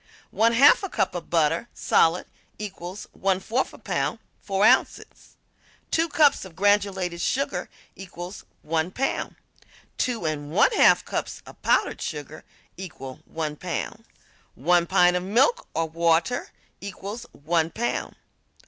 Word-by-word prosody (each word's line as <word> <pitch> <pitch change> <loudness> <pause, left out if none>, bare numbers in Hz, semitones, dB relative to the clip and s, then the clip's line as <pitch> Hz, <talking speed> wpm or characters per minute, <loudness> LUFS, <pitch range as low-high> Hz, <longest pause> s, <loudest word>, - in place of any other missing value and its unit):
One 230 +1 +3
half 275 +5 +6
cup 195 - 0
of 175 -2 -6
butter, 165 +6 +1
solid, 165 +2 +2 0.3
equals 190 -2 -7
1/4 195 +6 -1
pound - - -1 0.2
4 195 0 +1
ounces. - - +1 0.5
Two 330 +1 +2
cups 295 -2 +4
of 185 -4 -11
granulated 195 -3 +1
sugar 275 +9 -1 0.3
equal 180 -1 -8 0.3
1 160 +2 -1
pound. 265 +8 -2 0.6
Two 240 -8 -1
and 150 -2 -3
one 170 - +4
half 440 - +5
cups - - -4
of - - -15
powdered - - +1
sugar 150 0 -6 0.3
equal 145 -8 -8
1 155 -2 -4
pound. - - -5 0.5
One 170 +5 +2
pint 180 -1 +4
of 180 - 0
milk 235 - +2
or 165 0 0
water 170 +8 +1 0.3
equals 200 +4 -7
1 160 +2 0
pound. 235 +7 -3
185 Hz, 125 wpm, -25 LUFS, 165-210 Hz, 0.6 s, half